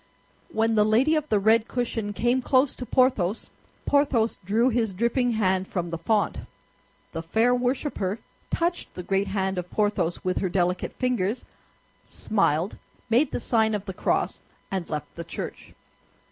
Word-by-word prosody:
When 225 -4 +1
the 210 -1 +5
lady 230 +9 +3
of 305 -1 -1
the 215 - +3
red 220 +2 +4
cushion 230 -4 -2
came 240 +5 +1
close 260 +1 +2
to 250 - -6
Porthos, 230 -6 +1 0.3
Porthos 270 -6 +2
drew 220 +7 +2
his 225 -4 0
dripping 235 +3 +1
hand 190 -3 +1
from 175 -2 -3
the 165 - -2
font. 205 +2 +1 0.7
The 165 - -4
fair 225 +9 +2
worshipper 245 -5 -1 0.3
touched 345 +1 -1
the 180 - -5
great 195 +2 0
hand 190 -1 -1
of 180 0 -6
Porthos 205 -5 0
with 185 0 0
her 190 - 0
delicate 180 0 0
fingers, 245 -3 -1 0.6
smiled, 185 -4 0 0.3
made 260 +5 +4
the - - -3
sign 220 -2 +2
of 205 -1 -4
the 190 - -5
cross, - - -1 0.3
and 190 -3 -3
left 150 -2 -4
the 170 - -6
church. - - -7
215 Hz, 160 wpm, -26 LUFS, 190-245 Hz, 0.7 s, the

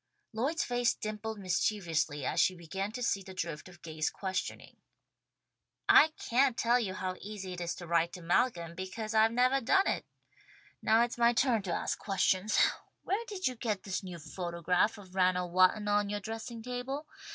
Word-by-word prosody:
Lloyd's 275 +9 0
face 245 -1 +1
dimpled 215 +1 -5
mischievously 170 -6 0
as - - 0
she 185 - +4
began 190 +4 -4
to 250 +1 -4
see 200 -4 +1
the 190 0 -11
drift 165 -1 -4
of 175 -1 -17
Gay's 155 -1 -2
questioning. 190 -1 -4 1.1
"I - - +8
can't 255 0 +2
tell 240 +1 +3
you 195 -6 -3
how 185 -2 -3
easy 195 -2 -6
it 175 - -6
is 170 -1 -2
to 175 - -8
write 170 0 +2
to 180 - -8
Malcolm, 170 -1 +1
because 190 +5 -5
I've 220 0 +5
nevah 250 +3 +3
done 385 - +3
it. - - -1 0.7
Now 225 +2 +4
it's 240 0 -3
my 235 0 +5
turn 240 -2 +2
to 190 -3 -4
ask - - -2
questions. 195 +1 +1 0.5
Where 410 +5 -1
did 390 -3 -5
you 255 - -1
get 220 -5 -3
this 195 -2 -3
new 180 -3 -7
photograph 175 +5 -1
of 190 -3 -13
Ranald 180 -2 +1
Walton 185 +3 +4
on 205 0 +2
yoah 205 0 -2
dressing 225 +2 -6
table? 250 +4 -4
205 Hz, 180 wpm, -31 LUFS, 180-235 Hz, 1.1 s, I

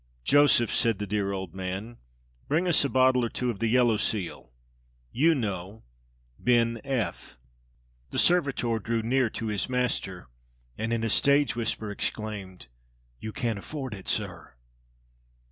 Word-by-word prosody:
"Joseph," 145 - +4
said 115 -3 +2
the 105 - -3
dear 100 0 -1
old 95 -4 -5
man, 95 +5 -5 0.5
"bring 165 +5 +1
us 170 -4 +4
a 140 - 0
bottle 130 -1 +4
or 115 - 0
two 125 +1 -1
of 100 - -9
the 115 - +1
yellow 120 -1 +4
seal 100 - -3 0.6
you 160 +6 +3
know 100 -4 -4 0.6
Bin 115 -1 +2
F." 130 - -3 0.7
The - - -5
servitor 135 -9 +2
drew 115 +1 -1
near 125 +1 +2
to 115 - -5
his 105 +2 -1
master, 125 - -1 0.5
and 110 +1 -3
in 115 -1 0
a 115 - 0
stage 140 0 +3
whisper 110 -2 -2
exclaimed: 105 -3 -5 0.5
"You 110 - -5
can't 115 -4 -2
afford 135 +2 -6
it, 95 -2 -9
sir!" - - -2
115 Hz, 145 wpm, -27 LUFS, 105-130 Hz, 0.7 s, Joseph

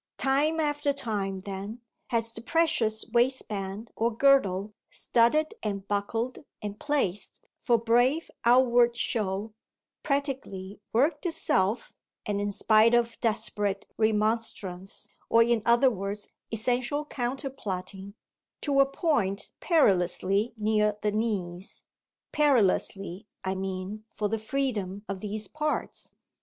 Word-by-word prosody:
Time 290 +4 +2
after 295 -1 +1
time, 200 -7 -3
then, 200 +4 -6 0.3
has 230 -1 0
the 225 - -7
precious 235 -7 +1
waistband 220 -4 -1
or 230 +1 +1
girdle, 215 -6 +3 0.2
studded 275 +7 +2
and 200 -2 -3
buckled 225 +4 -2 0.2
and 205 0 -6
placed 240 -10 -1 0.2
for 240 -2 +3
brave 245 +7 +2
outward 240 -1 +5
show, 210 -2 -1 0.5
practically 265 -9 -3
worked 290 +6 +2
itself, 230 - 0 0.3
and 205 -1 -1
in 205 - -1
spite 220 +3 +4
of 235 -1 +1
desperate 205 -3 0
remonstrance, 210 -3 -1 0.2
or 230 0 +6
in 235 -1 +2
other 240 +3 +5
words 200 0 -4 0.2
essential 245 +6 0
counterplotting, 220 -8 -5 0.4
to 280 -2 +1
a 275 - +6
point 255 - 0
perilously 200 - +2
near 210 -1 +1
the 210 - +2
knees 200 -4 -3 0.5
perilously 205 - +1 0.2
I 190 0 -1
mean 190 +2 -5
for 210 -1 -1
the 225 +1 -1
freedom 215 -5 -2
of 195 0 -4
these 210 +1 -4
parts. 305 +4 -3
220 Hz, 115 wpm, -28 LUFS, 200-255 Hz, 0.5 s, or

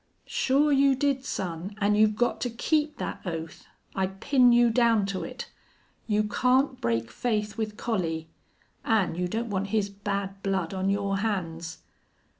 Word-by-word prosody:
"Sure 285 +3 +2
you 275 -1 +4
did, 275 0 0
son. 185 -4 -4
An' 205 0 +2
you've 215 0 +4
got 240 +3 0
to 245 - 0
keep 300 +6 0
that - - -5
oath. 165 -3 -6 0.3
I 190 -1 0
pin 245 +6 +3
you 240 0 +5
down 230 -3 +3
to 195 -1 -3
it. - - -7 0.6
You 210 -1 +2
can't 255 +5 +1
break 115 -1 -1
faith 210 - -1
with 215 -2 -3
Collie.... 165 -8 -2 0.6
An' 220 -7 +2
you 180 +2 -2
don't 225 +4 -3
want 200 0 -1
his 205 -1 0
bad 200 -1 -4
blood 190 -3 -1
on 190 0 -1
your 200 0 0
hands." 170 - -3
210 Hz, 160 wpm, -27 LUFS, 190-240 Hz, 0.6 s, you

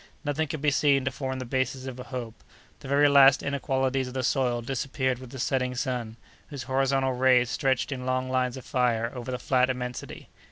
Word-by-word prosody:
Nothing 150 +2 0
could 155 -1 -5
be 150 - +4
seen 140 -1 +3
to 130 - 0
form 130 0 -4
the 130 - -5
basis 130 +1 -2
of 130 -1 -7
a 125 - -7
hope. 120 -4 -6 0.5
The - - -10
very 140 +2 +4
last 140 -1 +6
inequalities 135 -2 -1
of 125 - -9
the 130 - -1
soil 120 -2 +1
disappeared 130 0 -2
with 130 -1 -10
the 130 - -9
setting 130 0 -1
sun, 120 -4 -3 0.3
whose 140 -4 -7
horizontal 135 0 +1
rays 125 -1 +3
stretched 135 0 0
in 130 -2 -4
long 130 0 -1
lines 130 -1 0
of 130 - -10
fire 120 -3 0
over 125 -1 -7
the 125 - -2
flat 130 0 +2
immensity. 125 -1 -5
130 Hz, 205 wpm, -27 LUFS, 125-135 Hz, 0.5 s, last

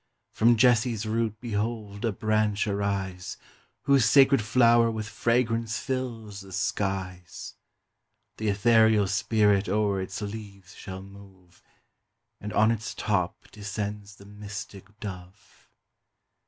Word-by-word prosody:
From 115 +1 +4
Jesse's 115 -2 +3
root 110 -1 -1
behold 110 -2 -3
a 115 - +1
branch 105 0 0
arise, 100 -3 -3 0.5
Whose 140 -3 +4
sacred 135 +3 +5
flower 115 +1 +4
with 110 -1 -4
fragrance 115 -1 0
fills 115 -6 -4
the 95 0 -13
skies: 95 -2 -3 0.8
Th' - - -14
ethereal 110 0 +4
spirit 100 0 +2
o'er 100 -1 +1
its 95 +2 -5
leaves 100 -3 -8
shall 95 -1 -8
move, 95 -2 -16 0.8
And 105 - -6
on 110 +2 +4
its 115 -1 -4
top 90 -5 -2
descends 105 -1 -5
the 100 - -16
mystic 105 0 -9
Dove. 95 -3 -10
105 Hz, 115 wpm, -27 LUFS, 100-115 Hz, 0.8 s, sacred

